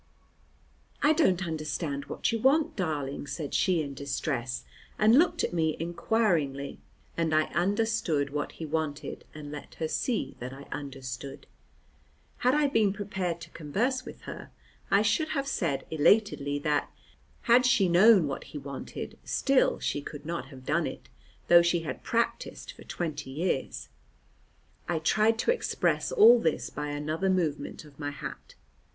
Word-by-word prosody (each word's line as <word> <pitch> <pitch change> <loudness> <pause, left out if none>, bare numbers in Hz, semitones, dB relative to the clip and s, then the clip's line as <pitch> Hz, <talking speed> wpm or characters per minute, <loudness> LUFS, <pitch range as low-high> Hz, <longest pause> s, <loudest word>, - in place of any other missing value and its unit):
"I 300 - +6
don't 190 - +2
understand 155 -3 -3
what - - -1
you 230 - -1
want, 280 +6 +3
darling," 145 -7 -3
said 150 -2 -5
she 175 -4 +2
in 140 -1 -6
distress, 135 -2 -3 0.3
and 220 +5 +6
looked 345 - +2
at - - -1
me 160 -2 +1
inquiringly, 165 -6 0 0.4
and 165 -2 +1
I 155 - +5
understood 190 -5 +1
what 145 0 -3
he 160 - -6
wanted, 155 -1 -3
and 150 -1 -8
let 150 - -9
her 160 - -2
see 235 +8 -1
that 125 +2 -6
I 135 +1 -10
understood. 135 -1 -6 0.9
Had 250 +3 +3
I 300 0 +3
been 220 -8 +2
prepared 190 -4 -3
to 170 -1 -10
converse 230 - -1
with - - -10
her, - - -8 0.4
I 200 +1 +4
should 220 +10 +2
have 275 0 -1
said 165 - -1
elatedly 155 -3 +3
that, 150 -1 0 0.5
had 245 +1 +5
she 225 -6 +4
known 185 +1 +6
what 140 -2 -4
he - - -8
wanted, 140 -1 -7
still 270 -1 +2
she 145 - -1
could 145 0 -9
not 165 -5 -4
have 130 -2 -13
done 155 +4 +1
it, 65 - -8 0.4
though 175 0 +8
she 170 0 +2
had 165 - -5
practised - - -2
for - - -14
twenty 155 -5 -4
years. 145 -1 -2 1.0
I 175 - +1
tried 215 +8 +3
to 455 - +2
express - - 0
all 235 +3 +8
this 160 -7 -1
by 150 0 -4
another 155 +5 -1
movement 170 -4 -1
of 145 -1 -17
my 145 -1 -2
hat. 145 - -8
165 Hz, 155 wpm, -29 LUFS, 145-210 Hz, 1.0 s, though